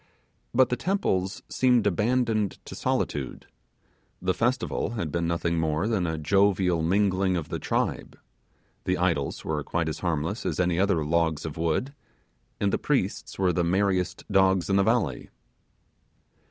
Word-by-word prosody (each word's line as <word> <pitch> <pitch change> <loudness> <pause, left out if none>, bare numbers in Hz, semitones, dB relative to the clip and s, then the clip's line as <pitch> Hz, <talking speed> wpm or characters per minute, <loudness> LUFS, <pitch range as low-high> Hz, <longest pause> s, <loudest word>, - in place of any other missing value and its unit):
But 130 +1 +4
the 125 - +1
temples 105 - -1
seemed 125 -3 +3
to 105 - +2
be - - -4
abandoned 110 -1 +1
to - - -8
solitude; 70 -3 -2 0.7
the 95 +1 0
festival 120 0 -1
had 80 -8 -2
been 85 +1 -1
nothing 85 0 0
more 80 +4 0
than 105 -6 0
a 80 -1 -2
jovial 95 +1 +2
mingling 95 +1 +2
of 80 - -5
the - - -3
tribe; - - -2 0.7
the 90 0 +1
idols 85 -6 -1
were 75 -2 -1
quite 80 -1 -1
harmless 85 +3 -2
as - - -2
any 90 -1 +1
other 95 -6 +2
logs 80 -1 +1
of 80 - -5
wood; 85 - -1 0.7
and 100 -1 +1
the - - +1
priests - - -1
were 95 -2 +2
the 85 - +1
merriest 95 +1 0
dogs 95 -1 +3
in - - +3
the 100 - +4
valley. 110 - 0
90 Hz, 155 wpm, -26 LUFS, 85-100 Hz, 0.7 s, But